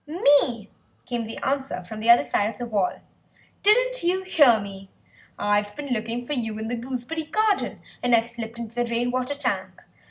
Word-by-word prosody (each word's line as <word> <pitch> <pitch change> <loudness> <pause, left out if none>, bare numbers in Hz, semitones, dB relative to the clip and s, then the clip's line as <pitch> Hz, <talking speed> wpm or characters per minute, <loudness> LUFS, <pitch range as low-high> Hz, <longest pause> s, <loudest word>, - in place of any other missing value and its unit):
"Me," 285 - +3 0.4
came 240 -2 -3
the 225 - -7
answer 270 -5 -1
from 215 +5 -8
the 225 +2 -1
other 235 - +8
side 205 +1 0
of - - -9
the 245 - -4
wall; 205 -5 -1 0.6
"didn't - - +3
you 365 +2 +1
hear 290 -11 +5
me? 195 -1 -9 0.5
I've 205 0 +1
been 285 -3 -3
looking 230 +2 -3
for 295 - -3
you 225 -5 -2
in 220 +1 -4
the 245 - -1
gooseberry 255 +6 -4
garden, 430 +5 0 0.2
and 245 -1 +4
I've 230 0 +2
slipped 235 -1 -6
into 230 -1 -7
the 240 0 0
rain 235 +1 -1
water 255 +3 -1
tank. 190 -10 -3
240 Hz, 190 wpm, -24 LUFS, 220-285 Hz, 0.6 s, other